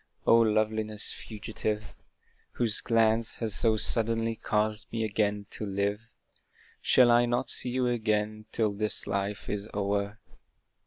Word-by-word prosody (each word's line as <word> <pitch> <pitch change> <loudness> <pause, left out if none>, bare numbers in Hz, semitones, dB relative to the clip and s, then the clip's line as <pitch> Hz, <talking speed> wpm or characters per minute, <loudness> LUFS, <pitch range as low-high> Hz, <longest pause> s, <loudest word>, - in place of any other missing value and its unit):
O - - +6
loveliness 110 -1 +1
fugitive! 110 0 -5 0.6
Whose 115 -4 +2
glance 115 -1 +2
has 110 -3 -2
so 110 0 +3
suddenly 115 +1 +2
caused 105 0 -1
me 115 -1 -2
again 105 -1 -1
to - - -6
live, 100 +1 -1 0.8
Shall 125 -2 +5
I 120 0 +4
not 120 0 0
see 125 - +1
you 125 +1 0
again 110 -2 -1
till 110 -2 +1
this 105 +1 -3
life 100 +1 -3
is 105 +1 -4
o'er! 100 +1 -1
110 Hz, 135 wpm, -28 LUFS, 105-115 Hz, 0.8 s, O